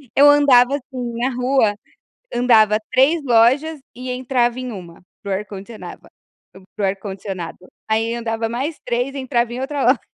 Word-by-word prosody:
Eu 285 +1 +7
andava 280 -3 +5
assim 250 -3 -6
na 245 +2 0
rua, 250 -4 +2 0.6
andava 220 -3 +4
3 300 +5 +3
lojas 265 +6 +3
e 255 +1 -7
entrava 250 -1 0
em 255 -1 -5
1, 175 -4 -10 0.2
para 200 - -6
o - - +2
ar-condicionava 205 +2 -8 0.7
para 210 - -2
o - - +4
ar-condicionado, 190 -2 -6 0.3
aí 225 +1 0
andava 225 -1 -2
mais 270 +7 -3
3 245 +3 -2
entrava 245 -3 -1
em 250 - -5
outra 275 +1 -2
loja. 255 0 +4
245 Hz, 155 wpm, -20 LUFS, 220-265 Hz, 0.7 s, Eu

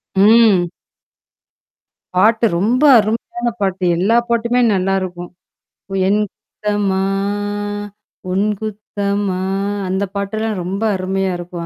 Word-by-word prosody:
ம். 205 -2 +5 1.5
பாட்டு 220 +5 +4
ரொம்ப 240 +8 +1 0.2
அருமையான 230 +3 -2
பாட்டு. 190 -1 -1
எல்லா 205 +7 +3
பாட்டுமே 235 +1 +1
நல்லாருக்கும். 185 -2 -2 0.8
என் 205 +2 +2
குத்தமா 205 -2 -2 1.3
உன் 195 +3 +1
குத்தமா 205 -2 -3 0.5
அந்த 190 +2 0
பாட்டெல்லாம் 210 +1 -2
ரொம்ப 195 +4 -3
அருமையா 190 0 -1
இருக்கும். 175 -1 -6
200 Hz, 90 wpm, -18 LUFS, 190-220 Hz, 1.5 s, ம்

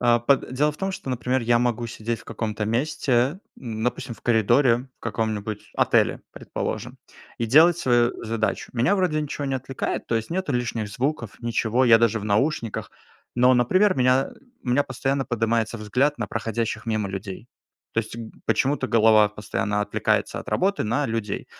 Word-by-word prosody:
а, 120 -1 +4
по 135 +4 +4
дело 140 +5 -1
в - - -14
том, 195 +2 -2
что, 160 - -7
например, 125 +1 0
я 120 0 +3
могу 120 -1 0
сидеть 115 0 -4
в - - -16
каком-то 110 -1 -3
месте, 130 - 0 0.2
допустим, 120 +1 -3
в - - -20
коридоре, 120 +2 +3
в - - -50
каком-нибудь 110 -2 -3
отеле, - - +2
предположим, - - -5 0.4
и 115 - -1
делать 160 +8 +6
свою 120 -6 +2
задачу. 110 -1 -2
Меня 125 +10 +3
вроде 175 -5 +1
ничего 150 -1 -4
не 135 -1 -1
отвлекает, 130 0 -3
то - - -1
есть, 115 +4 -2
нету 185 -3 -2
лишних 115 -3 -2
звуков, 125 0 -3
ничего, 120 +1 +1
я 115 -2 +7
даже 115 -1 +2
в 100 - -7
наушниках, 115 +2 -1 0.5
но, 125 +1 +5
например, 185 - +3
у - - -5
меня 130 +1 +3 0.3
у - - -8
меня 130 +4 +3
постоянно 135 +1 -1
поднимается 115 -1 0
взгляд 130 +8 0
на - - -2
проходящих 115 0 -3
мимо 110 -3 -1
людей. 95 +2 -6 0.5
То - - -1
есть 110 +1 -9
г 115 -1 -7 0.2
почему-то 135 -1 +1
голова 110 -2 +5
постоянно 105 0 -2
отвлекается 105 - 0
от - - -12
работы 195 +2 +1
на 120 +7 0
людей. 110 -3 -3
120 Hz, 175 wpm, -24 LUFS, 110-135 Hz, 0.5 s, я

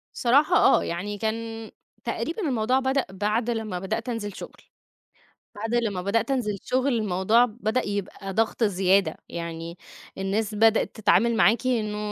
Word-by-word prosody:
صراحة 285 +8 +3
آه، - - +5
يعني 200 +5 -4
كان 225 +1 -4 0.3
تقريبًا 340 +6 -3
الموضوع 250 0 +1
بدأ 265 0 0
بعد 210 +5 -1
لمّا 220 -6 -2
بدأت 220 +5 -3
أنزل 205 -4 -4
شغل. - - -10 0.9
بعد 225 +3 -3
لمّا 210 -6 0
بدأت 225 +8 0
أنزل 210 -6 -1
شغل 260 +2 0
الموضوع 215 +2 +3
بدأ 230 +1 -2
يبقى 200 -1 -4
ضغط 225 +2 0
زيادة، 190 -3 +2
يعني 170 0 -6 0.4
الناس 205 +2 -1
بدأت 225 +2 +3
تتعامل 225 +2 +3
معاكِ 235 +3 +3
إنه 215 -4 0
220 Hz, 140 wpm, -25 LUFS, 195-235 Hz, 0.9 s, آه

